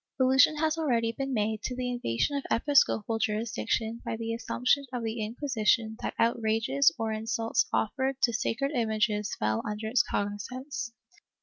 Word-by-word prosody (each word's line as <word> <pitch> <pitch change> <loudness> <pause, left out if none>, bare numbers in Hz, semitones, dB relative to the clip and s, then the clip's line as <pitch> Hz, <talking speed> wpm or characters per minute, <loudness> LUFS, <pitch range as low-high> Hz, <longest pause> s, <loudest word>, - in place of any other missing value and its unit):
Allusion 260 +3 +5
has 315 +1 0
already 235 -7 +1
been 270 +3 -4
made 220 -2 0
to 250 - -3
the 250 0 -2
invasion 240 - -1
of 280 - -2
episcopal 230 -4 +2
jurisdiction 225 +1 -1
by - - -3
the 230 0 -3
assumption 250 +4 +1
of 245 -2 -3
the 225 0 -2
Inquisition 225 -2 0
that - - -3
outrages 220 - +2
or 225 -1 -1
insults 225 +1 0
offered 265 +4 0
to 235 - +4
sacred 270 +4 -1
images 215 -4 0
fell 110 +1 0
under 210 +1 -4
its 245 +2 +4
cognizance. 230 +5 -4
230 Hz, 150 wpm, -29 LUFS, 220-255 Hz, -, Allusion